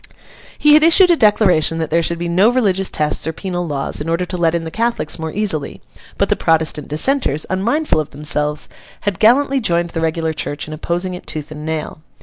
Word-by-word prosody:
He 300 0 +5
had 305 - +7
issued 345 +3 +6
a - - +5
declaration 195 - +3
that 160 -2 -3
there 165 +1 +3
should 170 +1 -1
be 170 +1 -4
no 185 +6 +3
religious 195 -7 +1
tests 150 0 -1
or 160 - -2
penal 175 -1 -4
laws, 140 -1 -3
in 155 - -4
order 170 +2 0
to 180 - -6
let 170 -1 +1
in 170 - -2
the 160 - -6
Catholics 230 -8 -2
more 160 0 -4
easily; 190 -8 -3 0.4
but - - +1
the - - +1
Protestant 160 -2 0
dissenters, 155 - 0
unmindful 230 - 0
of 155 - -3
themselves, 150 +1 -2 0.3
had 200 -4 -2
gallantly 270 +4 +3
joined 170 -5 0
the 165 - -3
regular 160 0 -1
church 145 0 -5
in 155 - -7
opposing 175 +4 -3
it 180 - -9
tooth 155 -1 -5
and 150 0 -7
nail. 155 -1 -4
170 Hz, 210 wpm, -17 LUFS, 155-210 Hz, 0.4 s, had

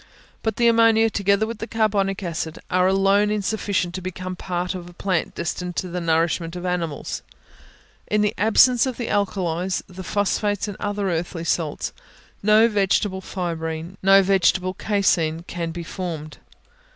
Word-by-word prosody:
But 220 -2 -1
the 235 - +3
ammonia, 225 -1 +5
together 200 +1 +2
with 225 0 -6
the 225 - -4
carbonic 205 -3 0
acid, 165 -2 -3
are 185 0 +3
alone 195 +2 +3
insufficient 205 -3 -1
to 185 - -4
become 185 0 -5
part 180 0 -3
of 175 -1 -7
a - - -14
plant 185 -1 -1
destined 180 +1 -3
to 185 - -2
the 180 +1 -3
nourishment 165 +1 0
of 180 0 -5
animals. 170 -4 -3 0.9
In 210 0 +1
the 210 0 +1
absence 240 +4 +4
of 255 - -4
the 240 - -3
alkalies, 185 -3 -1
the 185 0 -9
phosphates 205 +1 0
and 205 - -5
other 205 -2 -1
earthy 165 0 -3
salts, 165 -3 -1 0.5
no 215 +2 +5
vegetable 195 -2 +1
fibrine, 165 -2 -4
no 195 +1 +6
vegetable 185 -1 +2
caseine, 170 -6 +1
can 170 -2 -4
be 170 +1 -5
formed. 160 -4 -6
190 Hz, 155 wpm, -23 LUFS, 175-205 Hz, 0.9 s, no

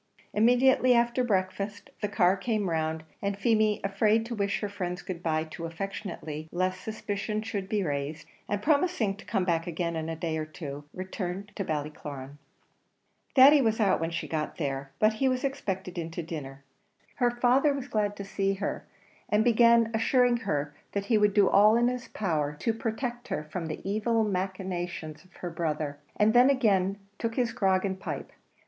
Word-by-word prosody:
Immediately 250 +3 +5
after 235 +1 +2
breakfast 200 -1 -2
the 210 - +1
car 190 -2 +3
came 205 -2 -1
round, 160 0 -1 0.2
and 200 0 -1
Feemy, 215 0 +2
afraid 210 +3 +2
to 235 - -5
wish 200 -3 0
her 205 - -1
friends 180 -3 -4
good 180 -2 -6
bye 155 -2 0
too 160 +1 -7
affectionately 165 -3 -6
lest 185 +1 -1
suspicion 215 0 -3
should 200 -3 -4
be 210 -2 +1
raised, 145 0 -3 0.2
and 205 0 -1
promising 290 - +2
to 205 - -14
come 185 - 0
back 165 -2 0
again 170 0 -2
in 160 0 -3
a 165 - -3
day 160 -1 -2
or 155 - -2
two, 145 -2 -7
returned 190 +1 -5
to 200 - -2
Ballycloran. 145 -3 -5 1.0
Thady 280 +2 +8
was 225 -2 +1
out 205 -3 +3
when 165 0 -1
she 170 0 -4
got 155 -1 -3
there, 135 -3 -3
but 215 0 +4
he 265 - +4
was 255 0 -1
expected 190 -10 -3
in 165 -1 -4
to 165 +1 -5
dinner. 140 -4 -7 0.5
Her 245 -1 +3
father 250 +4 +3
was 275 -2 -4
glad 210 -4 0
to 200 - -6
see 195 0 -1
her, 195 +1 -4 0.4
and 210 +1 +3
began 235 -1 +5
assuring 245 +2 +3
her 150 -9 -2 0.2
that 200 0 -1
he 220 +1 +3
would 210 -1 +3
do 200 -2 +6
all 210 +2 +6
in 240 +1 +4
his 250 -1 -4
power 155 -10 -1
to 230 - +1
protect 240 +2 -3
her - - -2
from 165 +2 -5
the 155 +4 -6
evil 220 +3 +1
machinations 185 -5 -3
of 185 - -24
her 175 - -6
brother, 155 -3 -2 0.2
and 215 +1 +3
then 245 +2 +7
again 200 -8 +2 0.2
took 230 -1 -2
his 245 -2 0
grog 190 -1 +2
and 190 -1 -2
his - - -19
pipe. - - -5
195 Hz, 185 wpm, -28 LUFS, 165-225 Hz, 1.0 s, Thady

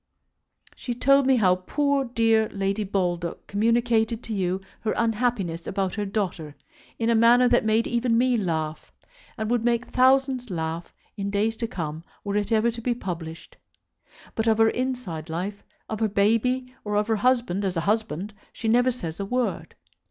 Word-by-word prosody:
She 245 - -5
told 275 +2 +4
me 265 - +5
how 185 -6 +3
poor 280 +8 0
dear 225 -2 +2
Lady 195 +1 -1
Baldock 175 -3 -2
communicated 230 +1 +1
to 225 - -5
you 185 -2 0 0.2
her 220 - -1
unhappiness 220 -7 0
about 195 -1 -1
her 210 -1 -2
daughter 180 -7 -3 0.4
in 230 0 +1
a - - +4
manner 235 +2 +5
that - - +3
made 220 +1 +2
even 235 -1 +1
me 250 +1 +3
laugh; 160 -7 -2 0.5
and 220 -1 -2
would 240 -2 +1
make 240 0 +1
thousands 260 -1 +2
laugh 165 -1 -4 0.3
in 200 0 -2
days 210 +3 0
to 230 - -2
come 160 -5 -5 0.2
were 200 0 -3
it 205 +1 -1
ever 225 +1 +3
to 230 0 -8
be 240 +1 0
published. 165 -6 -7 0.8
But 225 0 -1
of 220 -1 +4
her 225 0 +5
inside 245 - -4
life, 185 +5 -4 0.2
of 220 - -4
her 220 -1 +1
baby, 230 +5 +1
or 210 -1 -2
of 210 0 +2
her 220 -1 +1
husband 235 -4 +1
as 185 -3 -1
a - - +1
husband, 205 -1 -1 0.2
she 225 - -5
never 245 +3 +4
says 175 -10 -5
a 200 - -2
word. 250 +2 -2
220 Hz, 175 wpm, -25 LUFS, 190-240 Hz, 0.8 s, me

